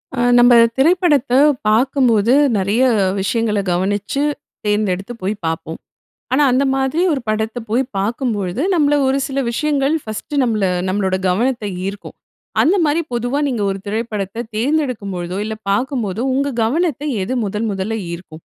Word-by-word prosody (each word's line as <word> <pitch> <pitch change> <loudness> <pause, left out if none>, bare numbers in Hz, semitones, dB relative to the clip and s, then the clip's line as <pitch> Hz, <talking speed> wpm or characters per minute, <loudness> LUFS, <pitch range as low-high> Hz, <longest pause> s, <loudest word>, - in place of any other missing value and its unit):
அ - - -3 0.2
நம்ப 245 0 +6 0.2
திரைப்படத்த 300 -3 +3 0.4
பாக்கும்போது, 235 -1 +3 0.2
நெறைய 200 +6 +1 0.4
விஷயங்கள 215 +1 0
கவனிச்சு, 200 +8 -1 0.4
தேர்ந்தெடுத்து 210 0 -1
போய் 190 +3 -1
பார்ப்போம். 160 0 -4 0.5
ஆனா, 290 +3 +4
அந்த 255 +2 +2
மாதிரி 270 +5 0
ஒரு 275 - -2
படத்த 220 +2 -1
போய் 240 +5 +2
பாக்கும்பொழுது, 210 -1 -2
நம்மள 295 -3 +3
ஒரு 265 +1 +2
சில 275 -1 -2
விஷயங்கள் 290 +3 0
ஃபர்ஸ்ட்டு 225 +6 -3
நம்மள 220 -4 0 0.3
நம்மளோட 190 -1 0
கவனத்த 235 +4 0 0.2
ஈர்க்கும். 200 +1 -7 0.5
அந்தமாரி, 330 -3 +2
பொதுவா 245 +4 -1
நீங்க 245 -6 -2
ஒரு 195 - -5
திரைப்படத்த 215 0 -3
தேர்ந்தெடுக்கும் 250 -5 -1
பொழுதோ, 175 +1 -4
இல்ல 220 0 -4 0.2
பாக்கும்போதோ 230 -2 -1
உங்க 280 +2 0
கவனத்த 295 +3 0 0.2
எது 220 - -3
முதல், 210 +3 -2
முதல்ல 195 +4 -3 0.2
ஈர்க்கும்? 165 -2 -10
230 Hz, 135 wpm, -18 LUFS, 200-270 Hz, 0.5 s, நம்ப